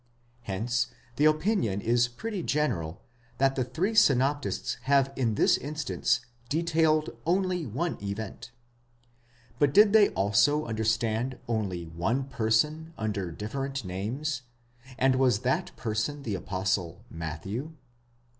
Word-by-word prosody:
Hence 115 +3 -1 0.3
the 150 - +3
opinion 155 - +2
is 120 +3 +2
pretty 200 - -5
general, 95 - -1 0.3
that 135 0 +3
the 130 - +1
three 180 - -1
synoptists 140 - +2
have 135 0 +3
in 115 -5 0
this - - +4
instance 150 +1 -1 0.3
detailed 160 -1 +2
only 180 -2 0
one 160 +10 -2
event. 110 +4 -5 1.1
But 145 -1 +3
did 210 0 +7
they 215 -2 +7
also 145 +10 +2
understand 110 +2 0
only 100 -7 -2
one 90 +12 -1
person 140 +7 0
under 105 -4 -2
different 135 +7 -4
names, 125 +10 -3 0.6
and 130 0 +3
was 125 -5 +3
that 130 +1 0
person 115 +6 -2
the 110 - -3
Apostle 95 -1 -2
Matthew 90 - -5
125 Hz, 115 wpm, -28 LUFS, 105-150 Hz, 1.1 s, did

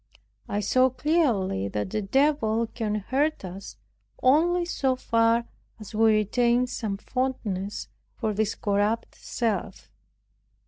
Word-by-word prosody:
I 205 - -1
saw 255 +6 +3
clearly 250 - +1
that 105 0 -3
the 215 - -1
devil 230 0 +2
cannot 215 -3 -3
hurt 285 -3 0
us 185 +2 -9 0.5
only 345 +7 +4
so 270 -6 0
far 230 -1 +2 0.3
as 215 -1 -10
we 220 0 +4
retain 240 +4 +2
some 220 -5 -4
fondness 210 -5 -3 0.3
for 220 -3 -2
this 215 0 0
corrupt 205 +2 0
self. 205 -5 -3
225 Hz, 120 wpm, -26 LUFS, 205-260 Hz, 0.5 s, only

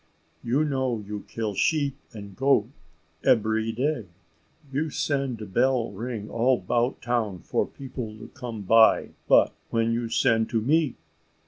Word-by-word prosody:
You 130 +6 +2
know 130 -4 0
you 105 0 -6
kill 110 -2 -3
sheep 145 - +1 0.2
and 100 -4 -10
goat 135 -5 +2 0.5
ebery 110 0 +2
day. 125 -1 -1 0.7
You 155 +3 0
send 130 -9 -2
bell 125 0 +2
ring 110 +1 -5
all 125 +3 +2
'bout 120 +7 -1
town 115 -7 -1
for - - 0
people 125 -5 -7
to 110 - -11
come 120 -5 -7
buy; 110 +3 +5 0.2
but - - +5 0.2
when 115 0 +1
you 115 0 -2
send 115 -2 +2
to 115 -1 +1
me? 150 +3 +2
115 Hz, 140 wpm, -26 LUFS, 110-130 Hz, 0.7 s, buy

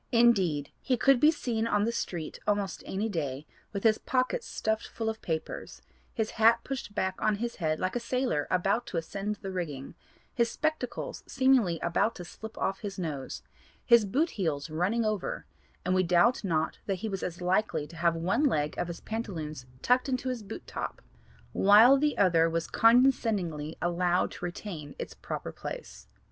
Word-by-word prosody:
Indeed 195 - +3
he 255 - +1
could 270 +2 +5
be 300 - +7
seen 230 -7 -1
on 205 -2 +2
the 230 - +1
street 175 -8 -4
almost 205 -2 0
any 205 +4 -1
day 150 -8 -3 0.3
with 200 -2 -4
his 220 -1 +4
pockets 265 - 0
stuffed 220 0 -2
full 225 -1 -3
of 220 0 -5
papers, 160 -2 -5 0.3
his 220 -1 -2
hat 230 +1 +4
pushed 265 -6 -5
back 190 -2 -1
on 215 -1 +2
his 235 +3 -4
head 155 -3 0
like 185 - -1
a - - +1
sailor 245 - -1
about 195 +6 +1
to 175 - -4
ascend 195 +5 -3
the 195 -1 -7
rigging, 150 -7 -4 0.4
his 235 -1 +2
spectacles 310 -3 -3
seemingly 260 -11 +3
about 175 +6 +1
to 180 - -8
slip 220 +5 -10
off 195 - -1
his 200 -2 -6
nose, 150 -7 -4 0.4
his 235 -2 +6
boot 285 - +1
heels 160 -6 -2
running 195 +9 +1
over, 215 -3 -2 0.4
and 180 - +1
we 185 - +4
doubt 180 +7 +3
not 160 -5 0
that 195 - +1
he - - 0
was 195 -3 -3
as 175 -1 -4
likely 180 -3 +1
to 165 - -13
have 170 0 +2
one 190 - +1
leg 150 - +1
of 175 - -1
his 170 -1 -7
pantaloons 160 - -5 0.2
tucked 250 +2 +3
into 255 0 -1
his 250 -3 -3
boot 210 +1 -8
top - - -5 0.5
while 215 +7 +7
the 295 +2 +1
other 165 -4 +4
was 165 0 -1
condescendingly 220 - +3
allowed 175 +1 +1
to - - -10
retain 175 -5 -6
its - - -6
proper - - -5
place. - - -8
200 Hz, 180 wpm, -29 LUFS, 170-235 Hz, 0.5 s, be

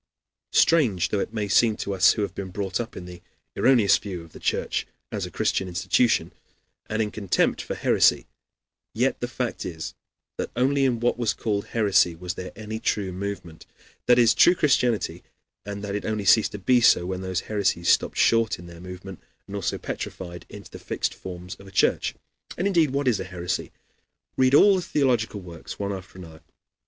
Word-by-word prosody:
Strange 120 - +3
though 105 - 0
it - - -3
may 105 -2 -2
seem 110 +2 +4
to 100 - -3
us 95 -1 +5
who 105 - -2
have 100 -3 -4
been 95 -1 -6
brought 95 +1 -3
up 120 -1 -5
in 90 - -7
the 90 -1 -11 0.3
erroneous 120 -7 +4
view 90 -5 -6
of 85 - -16
the - - -11
Church - - -1 0.2
as - - -3
a - - -9
Christian 95 - -1
institution, 95 +6 +1 0.6
and 110 +1 0
in 105 - -4
contempt 100 -4 0
for - - -5
heresy, - - +3 0.7
yet - - +1
the - - -2
fact - - -3
is 80 -2 -6 0.5
that - - -2
only 135 +2 +2
in 120 -3 +1
what 120 +1 0
was 115 -3 0
called 105 -3 -2
heresy 100 -6 +2
was 90 +1 -5
there 90 0 -7
any 110 0 -6
true 100 -4 -1
movement, 95 -4 -6 0.4
that 125 - +6
is, 115 -2 +5
true 175 +10 +6
Christianity, 125 - +1 0.5
and 100 0 -5
that 100 -1 -4
it 105 - -3
only 105 -2 -2
ceased 110 +3 +4
to - - -4
be 120 +5 +3
so 90 -6 +5
when 95 0 -4
those 95 0 -2
heresies 100 -5 -1
stopped - - +3
short 115 -1 +3
in 85 - -12
their 85 -1 -12
movement 90 +1 -9 0.2
and 100 - -8
also 100 -4 -2
petrified 85 -1 -7
into - - -11
the - - -9
fixed - - -2
forms 90 -1 -8
of 100 - -14
a - - -12
church. - - +1 0.4
And, 180 - -1
indeed 170 -7 +3
what 140 +1 -1
is 120 -5 +2
a - - -3
heresy? 90 -1 -4 0.6
Read 130 +1 +4
all 195 +5 +7
the - - -1
theological 125 - 0
works 85 -3 -9
one 100 0 -3
after 95 -1 -9
another. 80 -3 -11
100 Hz, 195 wpm, -25 LUFS, 90-115 Hz, 0.7 s, all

